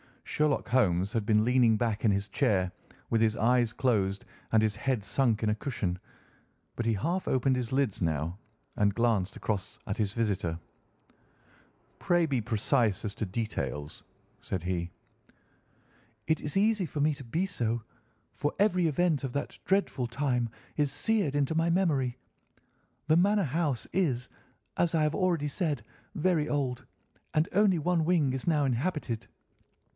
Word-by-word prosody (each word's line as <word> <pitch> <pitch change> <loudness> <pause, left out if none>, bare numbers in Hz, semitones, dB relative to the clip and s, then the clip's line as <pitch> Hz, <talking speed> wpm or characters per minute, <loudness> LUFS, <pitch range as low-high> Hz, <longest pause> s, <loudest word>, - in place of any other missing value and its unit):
Sherlock 150 -2 0
Holmes 100 -5 +2
had 110 -3 -1
been 105 -1 +4
leaning 120 -2 +4
back 110 -2 -1
in - - +5
his 100 0 0
chair 100 -7 +1 0.4
with 115 - +3
his 110 -1 +3
eyes 120 0 +2
closed 100 -6 0 0.3
and 110 -1 +4
his 105 -2 +1
head 125 -2 -1
sunk 115 -1 +1
in 110 - +2
a - - +3
cushion, 105 -7 -3 0.8
but 120 - -3
he 115 - +3
half 170 - -1
opened 130 0 +2
his 125 -3 -3
lids 135 -7 0
now 80 +2 -1 0.4
and 100 -1 +2
glanced 115 -5 +1
across 100 -4 -3
at 100 - -3
his 105 -2 0
visitor. 95 -8 -1 1.4
"Pray 175 -1 +2
be 135 -6 0
precise 110 -1 +1
as 100 - -3
to 110 - -2
details," 95 -8 -4 0.4
said 90 -3 -4
he. 90 -1 -2 1.4
"It 160 -1 +1
is 150 +5 -2
easy 210 -2 +2
for 145 0 -3
me 150 +1 +3
to 135 -2 -11
be 165 +11 0
so, 120 -11 -2 0.5
for 145 - -2
every 185 -4 +3
event 160 -1 +1
of 130 -2 -3
that 140 - -4
dreadful 190 -10 +1
time 125 -1 0 0.3
is 145 -2 +2
seared 195 - 0
into 145 +1 +1
my 165 +1 +2
memory. 150 -9 +1 0.9
The 155 +1 +5
manor 200 +3 +3
house 145 -4 -1
is, 135 -9 0 0.5
as 170 -1 +2
I 155 - +3
have 150 0 +1
already 170 -6 +1
said, 145 - -1 0.3
very 160 -3 +1
old, 135 -4 -2 0.5
and 155 +2 +3
only 200 -2 +4
one 165 +1 +1
wing 160 -6 +3
is 130 +3 -4
now 155 -3 +3
inhabited. 130 -2 -2
130 Hz, 160 wpm, -29 LUFS, 110-160 Hz, 1.4 s, in